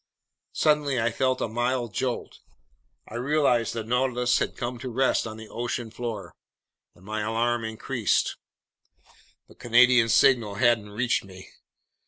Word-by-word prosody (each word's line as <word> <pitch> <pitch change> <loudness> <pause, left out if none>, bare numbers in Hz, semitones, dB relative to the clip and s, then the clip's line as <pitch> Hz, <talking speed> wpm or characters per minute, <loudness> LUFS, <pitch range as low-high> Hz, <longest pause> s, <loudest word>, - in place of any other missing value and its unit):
Suddenly 150 -4 +2
I 115 +1 +1
felt 130 +2 0
a - - 0
mild 120 0 -2
jolt. 125 +5 -3 0.7
I - - -12
realized 125 -2 +1
the 115 - -3
Nautilus 125 +1 +1
had - - -3
come 120 0 -4
to 130 - -5
rest 130 -1 +1
on 110 0 -8
the 110 0 -10
ocean 120 0 -4
floor. 110 -7 -6 0.6
My 105 +4 -5
alarm 115 +2 0
increased. 110 -1 -1 1.1
The - - -17
Canadian's 120 -1 +4
signal 115 -6 +4
hadn't 120 -2 +2
reached 115 +4 0
me. 95 -1 -13
120 Hz, 135 wpm, -26 LUFS, 110-125 Hz, 1.1 s, Canadian's